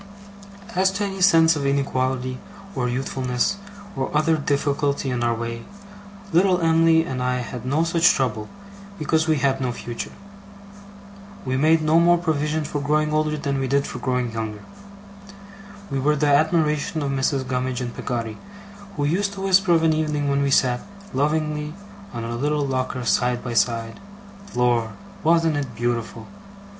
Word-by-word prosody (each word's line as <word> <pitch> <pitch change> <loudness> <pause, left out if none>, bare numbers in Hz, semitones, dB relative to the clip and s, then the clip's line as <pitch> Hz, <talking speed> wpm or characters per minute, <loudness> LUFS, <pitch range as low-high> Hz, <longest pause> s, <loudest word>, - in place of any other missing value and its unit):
As 190 -1 +3
to 205 +1 -2
any 195 -1 -4
sense 165 -3 +6
of 145 - -3
inequality, 130 -2 -1 0.3
or 125 -6 -1
youthfulness, 130 +5 -1 0.4
or 135 -1 -2
other 160 +1 +3
difficulty 140 -1 0
in 120 -1 -1
our 120 -1 +1
way, 115 0 -4 0.7
little 180 +1 +4
Em'ly 165 -1 +4
and 130 -3 -4
I 125 0 0
had 125 0 -7
no 150 +5 +2
such 170 +1 +4
trouble, 110 -5 -2 0.5
because 160 +1 +1
we 160 - +3
had 135 0 +1
no 125 -1 0
future. 120 0 -6 1.4
We 130 0 -1
made 155 +4 +3
no 155 +2 +4
more 175 +1 +5
provision 155 -2 -1
for 145 -1 -3
growing 150 +1 +1
older, 155 0 +1
than 140 -2 -2
we 135 - -1
did 140 +1 +1
for - - -6
growing 125 -2 -1
younger. 110 -2 -5 1.3
We 135 - -1
were 150 +3 +2
the 145 0 +2
admiration 155 0 +1
of 140 - -1
Mrs. 135 -1 0
Gummidge 125 0 -2
and 120 -1 -5
Peggotty, 115 -3 -4 0.6
who 145 - 0
used 195 +6 0
to 195 - -7
whisper 190 -2 +4
of 165 -1 +3
an 160 -1 +4
evening 150 -2 -1
when 140 0 +1
we 140 - +1
sat, 125 -2 +2 0.3
lovingly, 150 +2 -1 0.4
on 115 -1 -5
our 115 - -4
little 145 +4 0
locker 130 -2 -2
side 125 +1 +1
by 120 - -4
side, 115 -1 0 0.6
'Lor! 120 -2 +1 0.3
wasn't 165 -1 +3
it 140 -3 -4
beautiful! 115 -2 -2
140 Hz, 160 wpm, -23 LUFS, 125-160 Hz, 1.4 s, sense